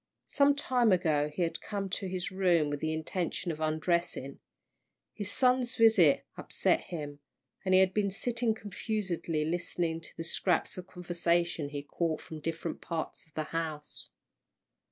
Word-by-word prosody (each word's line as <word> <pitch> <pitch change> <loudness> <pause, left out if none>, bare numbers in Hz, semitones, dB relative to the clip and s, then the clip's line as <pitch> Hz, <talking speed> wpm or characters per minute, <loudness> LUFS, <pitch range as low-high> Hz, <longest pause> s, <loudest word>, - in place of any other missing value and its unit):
Some 285 0 +4
time 250 -5 +3
ago 155 -5 +2
he 150 +4 -1
had 165 - -2
come 200 -2 -3
to 190 - -2
his 185 0 -3
room 175 -6 +3
with 145 - -2
the 155 +1 -1
intention 170 +2 -2
of 155 - -6
undressing. 155 -2 -1 0.7
His 205 -2 -2
son's 250 -1 +3
visit 215 - +5
had - - -6
upset - - +2
him, 145 -4 -6 0.4
and 185 -1 +3
he - - +8
had 190 0 +3
been 205 -2 +2
sitting 230 +2 0
confusedly 195 -7 -2
listening 165 0 -1
to - - -12
the 165 - -3
scraps 175 +1 +1
of 185 0 -7
conversation 175 -3 0
he 145 -1 -5
caught 160 +2 -1
from 160 - -8
different 165 +1 -4
parts 165 -1 -4
of 155 - -31
the 155 - -1
house. 155 -3 -3
175 Hz, 160 wpm, -31 LUFS, 160-195 Hz, 0.7 s, he